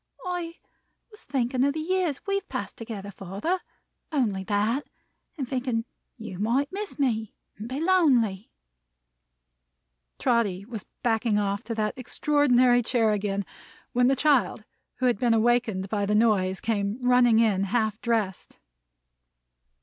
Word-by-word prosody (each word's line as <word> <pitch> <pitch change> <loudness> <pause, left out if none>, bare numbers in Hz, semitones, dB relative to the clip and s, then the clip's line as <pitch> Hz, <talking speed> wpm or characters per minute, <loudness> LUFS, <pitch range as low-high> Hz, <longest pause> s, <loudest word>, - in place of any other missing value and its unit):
"I 350 -2 -3 0.6
was 425 - -13
thinking 255 -1 0
of 280 +1 +2
the - - -2
years 345 -3 -1
we've 395 0 -2
passed - - -5
together, 210 -3 -7
father. 200 - -3 0.5
Only 220 -10 0
that. 215 +7 0 0.5
And 270 -4 -3
thinking 250 -3 -1 0.3
you 205 -6 -8
might 250 - +1
miss 405 +1 -5
me, 225 -6 -1 0.2
and 220 +3 -6
be 260 +2 -3
lonely." 265 - +2 1.7
Trotty 200 -5 +1
was 220 -3 -8 0.2
backing 225 -2 +1
off 200 0 0
to 230 - -3
that 215 -1 -1
extraordinary 255 -2 +3
chair 230 -2 +2
again, 200 -1 -2 0.5
when 245 0 +4
the 270 - +3
child, 270 -5 +2 0.3
who 255 - -2
had 240 -5 +2
been 235 -2 +3
awakened 225 -4 +1
by 205 0 -1
the 210 - +2
noise, 200 -4 +2
came 205 -1 -1
running 245 -2 +5
in, 210 -4 +3
half 215 +1 0
dressed. 220 -6 -2
235 Hz, 135 wpm, -26 LUFS, 210-265 Hz, 1.7 s, running